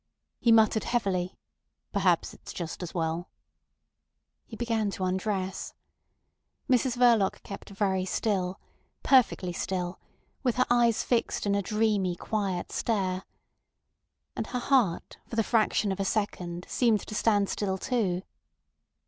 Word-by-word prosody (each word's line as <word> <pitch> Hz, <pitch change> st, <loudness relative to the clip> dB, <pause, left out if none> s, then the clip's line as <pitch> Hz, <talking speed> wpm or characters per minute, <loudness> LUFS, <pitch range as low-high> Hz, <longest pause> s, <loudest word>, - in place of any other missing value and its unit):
He 235 Hz, -, +3 dB
muttered 220 Hz, -1 st, +4 dB
heavily: 190 Hz, -7 st, -1 dB, 0.6 s
"Perhaps -, -, +2 dB
it's -, -, -11 dB
just 170 Hz, 0 st, -5 dB
as 180 Hz, -, -5 dB
well." 165 Hz, +1 st, -2 dB, 1.2 s
He 225 Hz, -, -8 dB
began 225 Hz, -2 st, 0 dB
to 195 Hz, -, -4 dB
undress. 190 Hz, +1 st, -2 dB, 0.9 s
Mrs 250 Hz, -1 st, +2 dB
Verloc 235 Hz, -5 st, +4 dB
kept 200 Hz, -, -8 dB
very 195 Hz, -2 st, 0 dB
still, 190 Hz, -2 st, -1 dB, 0.4 s
perfectly 235 Hz, -9 st, +3 dB
still, 180 Hz, 0 st, -3 dB, 0.4 s
with 250 Hz, -4 st, +1 dB
her 255 Hz, 0 st, +3 dB
eyes 235 Hz, -2 st, +4 dB
fixed 235 Hz, -3 st, 0 dB
in 200 Hz, -, +2 dB
a 200 Hz, -, +2 dB
dreamy, 205 Hz, -3 st, +1 dB
quiet 195 Hz, -2 st, -2 dB
stare. 190 Hz, -4 st, -1 dB, 1.1 s
And -, -, -3 dB
her 250 Hz, -, -2 dB
heart 245 Hz, -9 st, +1 dB
for -, -, -6 dB
the 225 Hz, -, +3 dB
fraction 215 Hz, -2 st, +2 dB
of 190 Hz, -, -3 dB
a -, -, +1 dB
second 180 Hz, -4 st, -2 dB
seemed 230 Hz, -4 st, +2 dB
to -, -, -8 dB
stand 205 Hz, -2 st, +2 dB
still 190 Hz, -2 st, -1 dB
too. 190 Hz, -5 st, 0 dB
205 Hz, 130 wpm, -28 LUFS, 185-230 Hz, 1.2 s, muttered